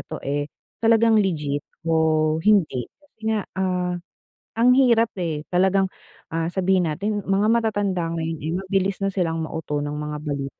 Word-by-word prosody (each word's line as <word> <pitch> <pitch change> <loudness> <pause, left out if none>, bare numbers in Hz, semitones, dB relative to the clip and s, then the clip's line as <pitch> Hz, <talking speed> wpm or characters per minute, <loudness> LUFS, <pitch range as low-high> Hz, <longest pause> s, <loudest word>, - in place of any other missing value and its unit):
to, - - -5
eh, 145 +1 -1 0.3
talagang 225 -1 +4
legit 150 -7 -1 0.2
o 160 -1 +2
hindi. 170 - +2
Kasi 290 -6 -31
nga, 215 -3 0
ah, 180 -1 -1 0.7
ang 245 - +5
hirap 235 -4 +5
eh 160 -4 -3
talagang, 190 +1 +3 0.5
ah, 165 0 0
sabihin 185 -2 +2
natin 205 +6 -2
mga 195 +2 +2
matatanda 205 -6 +1 0.2
ngayon, 160 0 -3
eh, 160 - -2
mabilis 195 0 -1
na 195 - +1
silang 170 -4 -1
mauto 155 -2 -3
ng 145 0 -3
mga 150 0 -4
balita 140 -2 -4
180 Hz, 155 wpm, -23 LUFS, 155-205 Hz, 0.7 s, ang